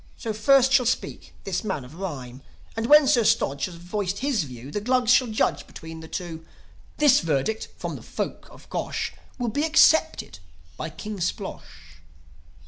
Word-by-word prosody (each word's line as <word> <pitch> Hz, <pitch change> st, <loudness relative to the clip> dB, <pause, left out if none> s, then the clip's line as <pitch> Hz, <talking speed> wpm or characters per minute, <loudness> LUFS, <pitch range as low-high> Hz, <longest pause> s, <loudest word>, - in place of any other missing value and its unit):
So, 225 Hz, -3 st, -4 dB
first 265 Hz, +4 st, +4 dB
shall 255 Hz, -3 st, +4 dB
speak 240 Hz, -, -3 dB
this 185 Hz, -2 st, -2 dB
man 190 Hz, -11 st, -3 dB
of 125 Hz, -, -13 dB
rhyme; 135 Hz, -9 st, -6 dB, 0.3 s
And, 225 Hz, +1 st, -2 dB
when 300 Hz, +1 st, +8 dB
Sir 250 Hz, -4 st, +4 dB
Stodge 140 Hz, -8 st, +1 dB
has 180 Hz, -, -8 dB
voiced 185 Hz, +3 st, -3 dB
his 250 Hz, -, 0 dB
view, 125 Hz, +1 st, -10 dB
The 210 Hz, -, -3 dB
Glugs 250 Hz, +1 st, +2 dB
shall 255 Hz, -, +4 dB
judge 180 Hz, -10 st, 0 dB
between 160 Hz, 0 st, -10 dB
the 160 Hz, -, -10 dB
two. 165 Hz, -2 st, -6 dB, 0.5 s
This 290 Hz, -3 st, +6 dB
verdict 165 Hz, +7 st, -1 dB
from -, -, -4 dB
the -, -, -12 dB
folk -, -, -5 dB
of -, -, -16 dB
Gosh -, -, -3 dB, 0.2 s
Will 245 Hz, -2 st, -1 dB
be 285 Hz, +7 st, -1 dB
accepted 315 Hz, -, +3 dB, 0.4 s
by -, -, -5 dB
King 210 Hz, +5 st, -7 dB
Splosh." 75 Hz, -, -6 dB
205 Hz, 170 wpm, -25 LUFS, 160-250 Hz, 0.5 s, when